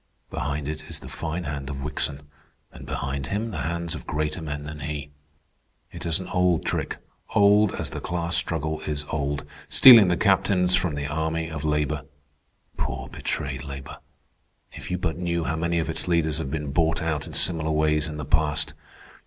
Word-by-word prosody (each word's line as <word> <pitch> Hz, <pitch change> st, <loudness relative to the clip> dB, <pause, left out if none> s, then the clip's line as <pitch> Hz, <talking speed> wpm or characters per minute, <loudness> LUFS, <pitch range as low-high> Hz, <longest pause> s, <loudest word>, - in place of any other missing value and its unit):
"Behind 70 Hz, 0 st, -2 dB
it 75 Hz, 0 st, -5 dB
is -, -, -4 dB
the -, -, -11 dB
fine 85 Hz, +2 st, -4 dB
hand 70 Hz, -3 st, -4 dB
of 70 Hz, -1 st, -5 dB
Wickson, 70 Hz, -1 st, -2 dB, 0.5 s
and -, -, -11 dB
behind 70 Hz, 0 st, -3 dB
him 110 Hz, +7 st, -2 dB
the 85 Hz, -, -4 dB
hands 85 Hz, +2 st, -2 dB
of 75 Hz, -7 st, -7 dB
greater 75 Hz, +3 st, -2 dB
men 75 Hz, -2 st, -4 dB
than 75 Hz, +1 st, -7 dB
he. 75 Hz, 0 st, -5 dB, 0.8 s
It -, -, -6 dB
is 80 Hz, +1 st, +1 dB
an 95 Hz, -, -6 dB
old 90 Hz, -3 st, +2 dB
trick, -, -, -1 dB, 0.4 s
old 100 Hz, 0 st, +5 dB
as -, -, -4 dB
the -, -, -5 dB
class 85 Hz, 0 st, -1 dB
struggle 80 Hz, -1 st, 0 dB
is 75 Hz, -1 st, -2 dB
old—stealing 75 Hz, -, +6 dB
the 90 Hz, -1 st, +2 dB
captains 90 Hz, +2 st, +3 dB
from 90 Hz, -4 st, 0 dB
the 70 Hz, 0 st, -3 dB
army 80 Hz, +2 st, -2 dB
of 80 Hz, -2 st, -5 dB
labor. 75 Hz, -1 st, 0 dB, 0.7 s
Poor 65 Hz, +1 st, -3 dB
betrayed 65 Hz, 0 st, -3 dB
labor! 70 Hz, -1 st, -8 dB, 0.7 s
If -, -, -9 dB
you 90 Hz, -, 0 dB
but 90 Hz, -1 st, -2 dB
knew 85 Hz, -1 st, 0 dB
how 80 Hz, -, -1 dB
many 85 Hz, +1 st, 0 dB
of 80 Hz, -, 0 dB
its 80 Hz, -, 0 dB
leaders 80 Hz, -3 st, +2 dB
have 70 Hz, -, -3 dB
been 75 Hz, -1 st, -3 dB
bought 80 Hz, +2 st, +1 dB
out 80 Hz, -3 st, -1 dB
in -, -, -7 dB
similar 80 Hz, -3 st, +3 dB
ways 75 Hz, 0 st, +2 dB
in 75 Hz, -, -6 dB
the 75 Hz, -, -4 dB
past. 75 Hz, 0 st, +1 dB
80 Hz, 185 wpm, -25 LUFS, 75-85 Hz, 0.8 s, old—stealing